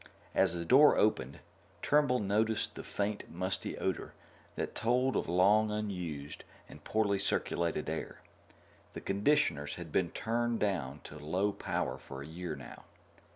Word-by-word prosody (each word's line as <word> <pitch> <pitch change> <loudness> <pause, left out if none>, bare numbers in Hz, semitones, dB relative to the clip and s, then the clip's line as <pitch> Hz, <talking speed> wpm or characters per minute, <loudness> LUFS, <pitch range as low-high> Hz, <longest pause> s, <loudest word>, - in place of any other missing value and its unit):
As 85 - +3
the 85 0 -3
door 140 - +7
opened, 70 -11 +1 0.5
Turnbull 145 -4 +4
noticed 110 +1 0
the - - -7
faint 105 0 -3
musty 90 +2 -3
odor - - -2 0.4
that - - -3
told 125 +3 +1
of - - -1
long 100 +5 +4
unused 90 -9 -4 0.2
and 75 - -13
poorly 100 -2 +1
circulated 85 -5 0
air. 80 - -4 0.7
The - - -6
conditioners 95 - +1
had 85 -3 -8
been 90 0 +2
turned 120 +3 -1
down 75 -9 -1
to 75 - -10
low 90 +8 0
power - - -2
for 70 0 -8
a - - -9
year 85 0 -5
now. 65 -3 -11
95 Hz, 145 wpm, -32 LUFS, 80-110 Hz, 0.7 s, door